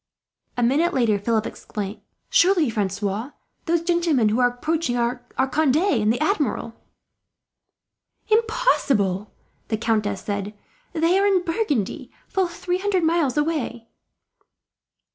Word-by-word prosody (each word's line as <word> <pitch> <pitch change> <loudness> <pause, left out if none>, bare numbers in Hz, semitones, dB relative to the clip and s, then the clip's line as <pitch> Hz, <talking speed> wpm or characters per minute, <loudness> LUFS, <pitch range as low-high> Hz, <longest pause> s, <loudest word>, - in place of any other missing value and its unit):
A 245 - +1
minute 290 +8 +2
later, 225 -5 +2
Philip 220 +1 0
exclaimed: 205 0 -6 0.3
"Surely, 345 -7 +4
Francois, 205 +4 -2 0.3
those 335 0 +1
gentlemen 335 -10 +2
who 220 +4 0
are 245 - +5
approaching 255 +1 -1
are 240 +1 0 0.3
Conde 300 -2 +3
and 260 - +2
the 240 - -1
Admiral!" 300 - 0 1.5
"Impossible!" 430 - +1 0.4
the 220 - -1
countess 210 -3 0
said. 205 0 -4 0.4
"They 335 +4 +2
are 400 - +3
in 380 -3 +3
Burgundy, 330 - -2 0.2
full 380 -2 0
three 355 +1 -3
hundred 380 -2 0
miles 320 -5 +1
away." 290 -7 -2
270 Hz, 120 wpm, -23 LUFS, 220-340 Hz, 1.5 s, are